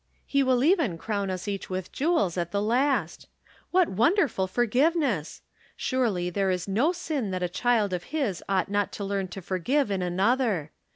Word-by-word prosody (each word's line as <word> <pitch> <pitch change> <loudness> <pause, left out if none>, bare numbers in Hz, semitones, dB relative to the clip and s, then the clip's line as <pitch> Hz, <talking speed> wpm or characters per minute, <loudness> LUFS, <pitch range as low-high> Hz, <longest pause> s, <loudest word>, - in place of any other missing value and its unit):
He 280 - +1
will 260 -2 +2
even 305 - +2
crown 200 +1 -2
us 185 +1 -4
each 200 -1 -4
with 185 -1 -4
jewels 275 - +1
at 170 -2 -2
the 200 - -1
last. 235 - 0 0.4
What 365 -1 +3
wonderful 230 - +2
forgiveness! 245 - +1 0.3
Surely 210 -9 0
there 195 +1 0
is 180 0 -1
no 235 - +2
sin 310 - -3
that 185 -1 -2
a - - +1
child 210 +1 +1
of 180 -1 -3
his 270 - -2
ought 195 0 +1
not 205 0 0
to 205 - -5
learn 195 -1 -2
to 185 +1 -8
forgive 205 - 0
in 195 -2 -1
another. 190 - +1
205 Hz, 175 wpm, -27 LUFS, 185-265 Hz, 0.4 s, What